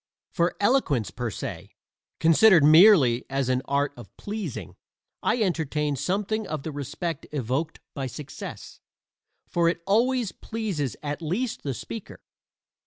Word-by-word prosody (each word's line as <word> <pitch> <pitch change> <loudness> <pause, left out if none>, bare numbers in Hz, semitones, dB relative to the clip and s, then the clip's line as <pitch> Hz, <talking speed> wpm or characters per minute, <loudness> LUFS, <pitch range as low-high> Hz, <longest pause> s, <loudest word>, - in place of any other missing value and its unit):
For 170 -1 0
eloquence 155 - +2
per 120 +5 -3
se - - -6 0.5
considered 165 +1 +6
merely 155 - +7
as 135 -1 -1
an 130 0 +1
art 140 +1 0
of 120 - -12
pleasing 170 - -5 0.5
I 245 - +1
entertain 150 -5 -1
something 200 - -1
of 150 -3 -4
the 160 - -4
respect 150 +4 -4
evoked 140 +3 -2
by 135 -3 -3
success; 140 +2 -8 0.7
for 170 -1 +2
it 170 - -2
always 235 +2 +2
pleases 195 - -3
at 145 +2 -3
least 200 +10 -2
the 135 -3 -3
speaker. 225 - -8
155 Hz, 130 wpm, -26 LUFS, 135-200 Hz, 0.7 s, merely